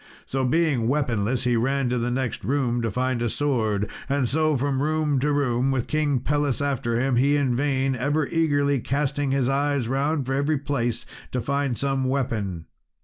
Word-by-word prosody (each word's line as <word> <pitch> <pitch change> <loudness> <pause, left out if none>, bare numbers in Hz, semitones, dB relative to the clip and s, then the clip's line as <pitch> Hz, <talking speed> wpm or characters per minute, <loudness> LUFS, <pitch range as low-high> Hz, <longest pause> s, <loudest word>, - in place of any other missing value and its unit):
So 135 0 -2
being 135 -3 +2
weaponless 125 -3 0
he 125 -1 +2
ran 135 +3 +1
to 125 0 0
the 120 +1 -1
next 125 -1 -2
room 125 -3 0
to 115 - -1
find 125 +2 -1
a 120 - 0
sword, 110 -7 0 0.2
and 140 -2 +1
so 155 +2 +2
from 135 +1 0
room 155 -2 +1
to 150 +3 +1
room, 130 -3 +1
with 130 -3 0
King 145 -4 0
Pelles 145 -1 0
after 125 -5 -1
him, 130 -1 +1
he 140 +4 +3
in 135 -4 +1
vain 135 0 +1
ever 145 +5 0
eagerly 145 -3 +1
casting 140 +2 -1
his 135 -2 +1
eyes 140 -2 0
round 140 +2 0
every 140 +3 +1
place 120 -5 -2 0.3
to 125 - 0
find 140 -1 -1
some 135 -1 0
weapon. 110 -10 -2
135 Hz, 180 wpm, -24 LUFS, 120-145 Hz, 0.3 s, he